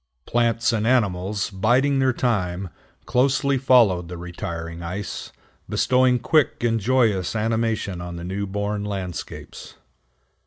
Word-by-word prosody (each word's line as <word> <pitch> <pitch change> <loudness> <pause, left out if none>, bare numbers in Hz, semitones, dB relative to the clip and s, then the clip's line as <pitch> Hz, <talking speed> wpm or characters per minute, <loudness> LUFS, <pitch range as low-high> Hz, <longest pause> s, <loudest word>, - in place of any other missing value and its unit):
Plants 115 0 +1
and 110 0 0
animals, 100 -5 +1
biding 125 +8 +2
their 130 -1 +3
time, 95 -7 -1 0.4
closely 135 +1 +2
followed 115 -10 +4
the 90 0 -7
retiring 85 -1 -6
ice, 90 +4 -5 0.4
bestowing 125 -1 +3
quick 145 0 +1
and 115 -1 +2
joyous 110 -5 +1
animation 110 -4 -1
on 85 0 -6
the 85 - -7
new 100 +3 -3
born 100 +1 -2
landscapes. 95 -4 -6
105 Hz, 120 wpm, -23 LUFS, 90-125 Hz, 0.4 s, followed